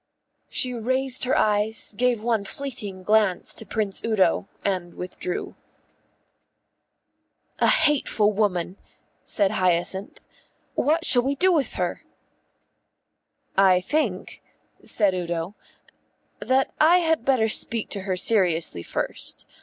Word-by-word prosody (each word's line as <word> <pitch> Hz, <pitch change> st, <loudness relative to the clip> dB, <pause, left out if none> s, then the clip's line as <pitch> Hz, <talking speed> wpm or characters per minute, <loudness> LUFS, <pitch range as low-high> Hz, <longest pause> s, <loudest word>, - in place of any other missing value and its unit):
She 250 Hz, -1 st, +2 dB
raised 260 Hz, +3 st, +1 dB
her 255 Hz, -, +1 dB
eyes, 215 Hz, +1 st, +1 dB
gave 240 Hz, -1 st, 0 dB
one 225 Hz, -3 st, 0 dB
fleeting 205 Hz, -5 st, -5 dB
glance 210 Hz, -3 st, +3 dB
to -, -, -6 dB
Prince 210 Hz, -3 st, -3 dB
Udo, 195 Hz, -4 st, +1 dB, 0.2 s
and 180 Hz, -3 st, -2 dB
withdrew. 180 Hz, 0 st, -5 dB, 2.1 s
"A -, -, +3 dB
hateful 290 Hz, -9 st, +2 dB
woman," 195 Hz, -3 st, -1 dB, 0.5 s
said 200 Hz, -2 st, 0 dB
Hyacinth. 185 Hz, 0 st, -1 dB, 0.5 s
"What 320 Hz, +3 st, +1 dB
shall 245 Hz, -, +5 dB
we 275 Hz, +3 st, -1 dB
do 370 Hz, +6 st, +3 dB
with 295 Hz, -5 st, 0 dB
her?" -, -, -3 dB, 1.5 s
"I 190 Hz, -2 st, +5 dB
think," 215 Hz, -3 st, -3 dB, 0.4 s
said 205 Hz, -4 st, +2 dB
Udo, 175 Hz, 0 st, -3 dB, 0.9 s
"that 265 Hz, +1 st, 0 dB
I 330 Hz, +4 st, +6 dB
had 325 Hz, -6 st, +1 dB
better 250 Hz, -4 st, +2 dB
speak 225 Hz, 0 st, 0 dB
to 200 Hz, -, -3 dB
her 185 Hz, -1 st, -3 dB
seriously 175 Hz, -, +1 dB
first. -, -, -3 dB
215 Hz, 115 wpm, -24 LUFS, 185-255 Hz, 2.1 s, I